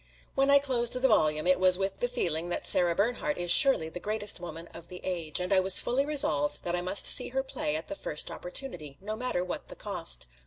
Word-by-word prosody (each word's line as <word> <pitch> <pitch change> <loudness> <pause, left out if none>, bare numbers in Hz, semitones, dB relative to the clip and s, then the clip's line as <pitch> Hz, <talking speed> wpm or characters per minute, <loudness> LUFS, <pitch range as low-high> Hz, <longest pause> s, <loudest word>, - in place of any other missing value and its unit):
When 275 +1 -1
I 280 - +5
closed 255 -4 -1
the 255 +1 -1
volume 155 -9 -1
it 185 0 +1
was 185 -1 +5
with 195 0 -5
the 245 - -2
feeling 175 -9 -3
that - - -5
Sara 175 -2 +2
Bernhardt 245 - -3
is 175 -1 +1
surely 270 - +7
the 160 +2 -9
greatest 210 0 -1
woman 165 -1 -10
of 170 0 -11
the 180 - -11
age; 170 -4 -3
and 180 +2 -3
I 190 - +3
was 185 0 +6
fully 270 +4 -2
resolved 145 - 0
that 175 0 -3
I 175 - -4
must 185 +3 -1
see - - +6
her 265 +1 -4
play 155 - -5
at 160 +1 -7
the - - -6
first 150 -6 -4
opportunity, 175 - -4
no 215 +3 -8
matter 235 -6 -3
what 180 - -8
the - - -12
cost. - - -4
185 Hz, 235 wpm, -26 LUFS, 170-245 Hz, -, surely